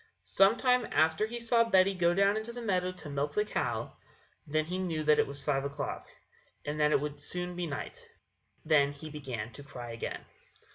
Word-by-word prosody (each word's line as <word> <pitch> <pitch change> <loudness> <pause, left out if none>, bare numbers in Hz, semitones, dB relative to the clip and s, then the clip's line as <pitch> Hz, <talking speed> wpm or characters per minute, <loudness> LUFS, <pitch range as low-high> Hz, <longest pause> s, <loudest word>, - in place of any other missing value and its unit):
Some 195 +4 +4
time 250 -2 +3
after 160 +6 +3
he 240 +2 -5
saw 235 0 +3
Betty 195 -3 +4
go 175 -2 +2
down 200 +1 +4
into 220 +2 -3
the 245 +1 -7
meadow 185 -4 +1
to 180 -3 -10
milk 140 +1 -2
the 210 - +2
cow; - - -2 0.5
then 155 +1 +1
he 180 +3 -3
knew 165 -4 -1
that 150 0 +4
it - - +3
was 140 0 -5
five 135 -2 +1
o'clock, 140 0 -4 0.6
and 150 +1 -3
that 150 0 +4
it - - +4
would 145 0 -4
soon 180 +4 -3
be 175 -1 -2
night; 145 -1 -6 0.6
then 145 -3 +4
he 155 +2 -9
began 125 -7 -5
to 115 - -10
cry 125 -5 -8
again. 115 - -5
160 Hz, 200 wpm, -31 LUFS, 145-195 Hz, 0.6 s, Some